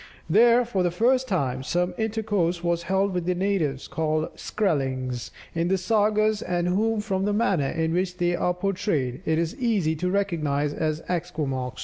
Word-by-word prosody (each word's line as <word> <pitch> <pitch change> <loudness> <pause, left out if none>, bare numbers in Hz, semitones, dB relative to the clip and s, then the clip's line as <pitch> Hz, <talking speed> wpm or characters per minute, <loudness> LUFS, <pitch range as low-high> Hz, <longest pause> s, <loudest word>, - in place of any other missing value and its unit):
There, 235 +7 +5
for 205 -5 -1
the 175 - +2
first 250 +8 +2
time, 135 - -1
some 175 +6 -1
intercourse 205 -6 -1
was 170 -1 +1
held 195 0 +2
with 180 -1 -2
the 180 - +1
natives, 175 -8 -1
called 155 0 -1
Skrellings 130 - -2 0.2
in 165 +1 0
the 190 +1 +2
sagas, 215 +2 +2
and 175 -1 -1
whom, 215 +4 +1
from 195 -2 -1
the 205 - +1
manner 195 - +1
in 160 0 -1
which 180 0 -1
they 175 -1 +1
are 180 +1 0
portrayed, 180 - -1
it 160 0 +2
is 165 0 -1
easy 205 -10 +1
to 180 +3 -1
recognize 155 -7 0
as 155 0 -2
Esquimaux. 150 -8 -2
180 Hz, 170 wpm, -25 LUFS, 155-200 Hz, 0.2 s, There